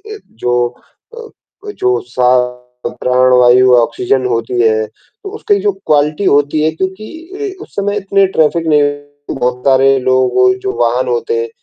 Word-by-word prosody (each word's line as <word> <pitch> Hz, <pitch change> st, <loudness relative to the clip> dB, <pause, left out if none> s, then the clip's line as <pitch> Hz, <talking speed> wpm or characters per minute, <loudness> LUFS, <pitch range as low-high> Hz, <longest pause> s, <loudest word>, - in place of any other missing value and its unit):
अ, -, -, -10 dB
जो 120 Hz, +1 st, -1 dB, 0.5 s
अ, -, -, -12 dB, 0.5 s
वो 415 Hz, -, -6 dB
जो 125 Hz, -, -1 dB
सा 125 Hz, 0 st, +1 dB, 0.6 s
प्राण 125 Hz, +1 st, +1 dB
वायु 125 Hz, +1 st, +5 dB
ऑक्सीजन 125 Hz, +2 st, 0 dB
होती 120 Hz, 0 st, -2 dB
है, 110 Hz, -1 st, +1 dB, 0.4 s
उसकी 420 Hz, +1 st, -1 dB
जो 410 Hz, -, +1 dB
क्वालिटी 150 Hz, +5 st, +1 dB
होती 145 Hz, -1 st, +2 dB
है 160 Hz, -, +1 dB
क्योंकि 320 Hz, -, -6 dB
अ, -, -, -12 dB
उस -, -, -19 dB
समय 205 Hz, +1 st, -1 dB
इतने 195 Hz, 0 st, +1 dB
ट्रैफिक 160 Hz, +1 st, +1 dB
नहीं 150 Hz, -1 st, +3 dB, 0.6 s
बहुत 125 Hz, 0 st, -1 dB
सारे 135 Hz, 0 st, +4 dB
लोगों 130 Hz, -, +2 dB
के 380 Hz, -, -3 dB
जो 390 Hz, 0 st, -3 dB
वाहन -, -, 0 dB
होते 455 Hz, -1 st, -1 dB
हैं, 455 Hz, 0 st, -4 dB
150 Hz, 160 wpm, -14 LUFS, -, 0.6 s, वायु